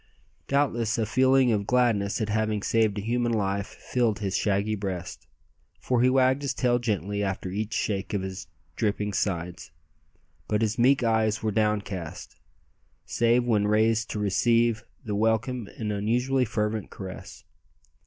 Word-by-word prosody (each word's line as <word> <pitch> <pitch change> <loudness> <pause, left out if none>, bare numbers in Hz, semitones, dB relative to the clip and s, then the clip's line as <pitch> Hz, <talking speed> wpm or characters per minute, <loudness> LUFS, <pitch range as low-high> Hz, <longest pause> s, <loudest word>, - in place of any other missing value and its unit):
Doubtless 120 -5 +1
a 110 - +1
feeling 130 +2 +3
of 100 -2 0
gladness 115 -5 +2
at 110 - -1
having 110 -1 0
saved 110 -2 +2
a 100 - -3
human 120 +1 0
life 100 -1 -1
filled 115 -1 -1
his 95 -2 -2
shaggy 100 +1 +1
breast, 95 -4 -5 0.5
for 125 -2 0
he 125 - +5
wagged 130 +1 +3
his 140 - -2
tail 120 -1 +2
gently 105 -3 -2
after 95 -2 -3
each 105 +3 -3
shake 100 -2 -2
of 95 - -1
his 95 -2 -6 0.3
dripping 105 -1 -1
sides; 90 -4 -2 0.8
but 105 +1 +1
his 110 +2 -1
meek 130 +2 +4
eyes 110 -2 +1
were 110 - +1
downcast, 100 -5 -2 0.7
save 120 +1 +2
when 105 -4 +1
raised 110 +1 +2
to - - -4
receive 115 +2 +2 0.2
the 105 - -3
welcome 110 +2 0
and 105 -2 -3
unusually 125 +6 +1
fervent 105 -1 -2
caress. 95 -2 -9
110 Hz, 150 wpm, -26 LUFS, 100-120 Hz, 0.8 s, he